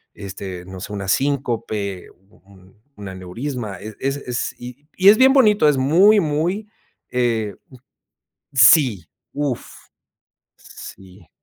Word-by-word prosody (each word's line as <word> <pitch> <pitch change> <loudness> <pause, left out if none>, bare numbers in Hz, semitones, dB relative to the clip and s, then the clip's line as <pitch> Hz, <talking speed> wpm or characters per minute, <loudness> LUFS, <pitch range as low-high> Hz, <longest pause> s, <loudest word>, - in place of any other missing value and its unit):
este, 95 -2 -8
no 95 0 -10
sé, 105 - -7
un 100 - -5
síncope, 110 -5 -2
u 95 +2 -27
un 95 +1 -21 0.2
un 100 -1 -9
aneurisma, 100 +3 -6
eh, 110 +1 -9
es 135 +1 -2
es 125 -3 -4
y 125 +4 -11 0.2
es 215 - +6
bien 265 +1 +5
bonito, 210 - +4
es 145 - +1
muy, 180 +11 +4
muy, 170 +6 -2 0.4
eh 115 -5 -1 1.0
Sí, 130 - +5 0.3
uf, 145 -4 -3 0.9
sí. 95 -2 -14
120 Hz, 120 wpm, -20 LUFS, 100-145 Hz, 1.0 s, es